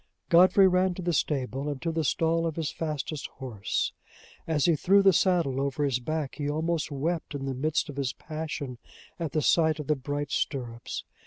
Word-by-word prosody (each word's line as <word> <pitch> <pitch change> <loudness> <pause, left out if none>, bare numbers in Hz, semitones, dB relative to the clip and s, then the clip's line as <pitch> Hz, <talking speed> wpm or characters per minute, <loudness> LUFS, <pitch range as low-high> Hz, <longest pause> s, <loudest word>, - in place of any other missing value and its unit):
Godfrey 185 +3 +7
ran 185 0 +2
to 185 - -6
the 175 0 0
stable, 135 -1 -1
and 145 -2 -4
to 165 - 0
the 160 0 -1
stall 165 +3 +1
of 160 - -3
his 160 -3 -2
fastest 155 -2 -4
horse. 120 -7 -2 0.5
As 155 -3 +2
he 170 - +4
threw 195 +6 +4
the 195 -1 +6
saddle 165 -7 +2
over 140 +1 -1
his 130 -3 +1
back, 155 +2 -3
he 145 0 -1
almost 160 +1 -1
wept 155 +2 -2
in 135 -1 -4
the 135 - -2
midst 150 +6 0
of 145 -2 -8
his 135 -3 0
passion 155 -5 -5 0.4
at 165 -5 -3
the 155 - +1
sight 160 -2 +3
of 150 - -4
the 150 - +2
bright 145 +1 -4
stirrups. 120 -4 -3
150 Hz, 195 wpm, -28 LUFS, 135-165 Hz, 0.5 s, Godfrey